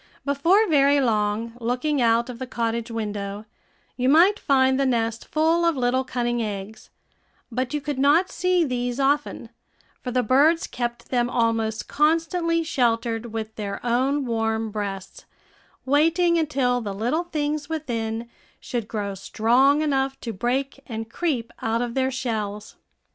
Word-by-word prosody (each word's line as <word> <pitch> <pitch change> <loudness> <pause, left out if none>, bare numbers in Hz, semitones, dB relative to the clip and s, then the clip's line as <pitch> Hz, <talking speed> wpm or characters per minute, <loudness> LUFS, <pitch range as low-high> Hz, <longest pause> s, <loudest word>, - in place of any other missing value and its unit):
Before 335 +10 +3
very 285 -2 +4
long, 220 -2 0
looking 250 +5 0
out 230 0 +3
of 250 -2 -8
the 260 - -5
cottage 230 -1 -2
window, 210 -2 -4 0.5
you 255 +1 +1
might 350 +8 +5
find 265 -1 +3
the 275 - +2
nest 230 -2 -1
full 325 +2 +2
of 335 -3 +2
little 255 +1 +1
cunning 240 -2 -1
eggs; 210 0 -6 0.6
but 255 +2 -2
you 300 - -1
could 290 -2 -4
not 295 +7 +4
see 365 -1 +2
these 245 -1 -2
often, 285 +2 0 0.5
for 255 - -5
the 250 0 +1
birds 290 +8 +4
kept 240 -1 -5
them 245 -1 +1
almost 225 -2 0
constantly 330 +2 +1
sheltered 235 -5 0
with 220 -1 -5
their 205 -2 -4
own 265 +4 +1
warm 225 -1 -1
breasts, 200 -2 -5 0.6
waiting 330 +5 +3
until 265 -6 +1
the 200 -3 -5
little 245 - -1
things 300 -2 -2
within 235 -7 -3 0.3
should 235 -4 -4
grow 205 -3 -3
strong 240 +9 +2
enough 270 -2 0
to 230 - -4
break 260 +7 -2
and 225 -2 -6
creep 265 -8 -2
out 230 0 0
of 240 -1 -4
their 265 0 +1
shells. 215 -5 -4
245 Hz, 150 wpm, -24 LUFS, 225-285 Hz, 0.6 s, might